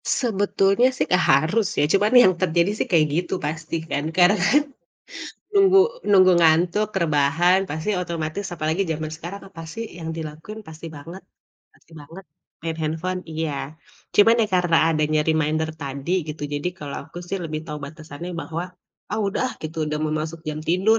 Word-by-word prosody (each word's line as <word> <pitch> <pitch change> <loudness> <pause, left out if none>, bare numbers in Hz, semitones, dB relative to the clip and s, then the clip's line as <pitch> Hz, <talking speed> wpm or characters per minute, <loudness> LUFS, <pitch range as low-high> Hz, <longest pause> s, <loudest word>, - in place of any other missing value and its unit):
Sebetulnya 205 -1 +2
sih - - 0
gak 180 - +4
harus 165 +11 +2
ya, 145 - +4
cuman 205 +2 +3
yang 190 -7 +7
terjadi 175 +1 +2
sih - - -1
kayak 160 -3 +5
gitu 175 +2 -1
pasti 160 +2 -4
kan, 145 - -1
karena 180 +2 +6 0.2
kan 295 +2 +4 0.9
nunggu 390 -1 +6 0.3
nunggu 185 -2 +7
ngantuk, 170 +5 +3
rebahan 165 +3 +3
pasti 155 +5 -4
otomatis 170 +2 -4
apalagi 160 +3 -1
zaman 155 0 -2
sekarang, 175 +5 -8
apa 165 -4 -10
sih 230 - -5
yang 160 -1 -6
dilakukan 160 +7 -7
pasti 160 +1 -10
banget 165 +6 -10 0.5
pasti - - -25
banget 165 +6 -12 0.4
main 165 0 -2
handphone, 170 +4 -2
iya. 160 -1 -2 0.6
Cuman 215 +3 +6
ya - - +2
karena 175 -2 +3
adanya 155 -1 +1
reminder 155 0 +1
tadi 140 +3 -5 0.2
gitu 150 0 -6
jadi 145 +4 -1
kalau 145 -2 -6
aku - - -10
sih 195 - -2
lebih 155 -1 -4
tahu 150 -1 -5
batasannya 155 +2 -9
bahwa, 165 +1 -4 0.5
ah 215 - -1
udah 195 - -1
ah 255 - -4
gitu 160 +1 -6
udah 150 - -2
mau 155 - -1
masuk 160 +1 -5
jam 155 0 -3
tidur 195 +6 +3
165 Hz, 170 wpm, -23 LUFS, 155-190 Hz, 0.9 s, yang